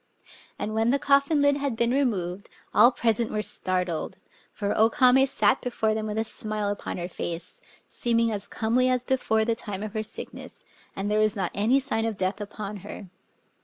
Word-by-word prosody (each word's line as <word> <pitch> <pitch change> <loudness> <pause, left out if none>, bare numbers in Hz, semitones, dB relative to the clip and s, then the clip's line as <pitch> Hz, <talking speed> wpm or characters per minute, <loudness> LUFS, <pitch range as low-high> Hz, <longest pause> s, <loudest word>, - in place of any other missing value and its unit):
And 215 - -3
when 225 +1 +2
the 275 - +3
coffin 280 +2 +3
lid 285 0 +4
had 280 -4 -2
been 235 +1 +1
removed, 200 -9 -1 0.2
all 235 +4 +7
present 230 -2 0
were 215 0 -1
startled; 180 -5 -2 0.3
for 205 -1 -2
O 220 +1 +5
Kame 265 0 +5
sat 265 - +2
before 225 -3 0
them 215 0 -2
with 210 0 -3
a 220 - +2
smile 215 -2 -3
upon 205 - -4
her 175 0 -3
face, 170 -1 -5 0.3
seeming 230 -1 +1
as 205 -2 -3
comely 245 +3 +1
as 250 -1 +1
before 220 -4 +1
the 230 - +2
time 205 -3 -6
of 215 -1 -6
her 215 - -1
sickness; 215 - -7 0.3
and 200 +2 -2
there 210 - +2
was 215 -1 +2
not 190 -4 -2
any 225 +7 +3
sign 255 -5 -1
of 225 -3 -2
death 190 +2 -1
upon 205 0 -6
her. 200 -1 -9
220 Hz, 195 wpm, -26 LUFS, 205-245 Hz, 0.3 s, all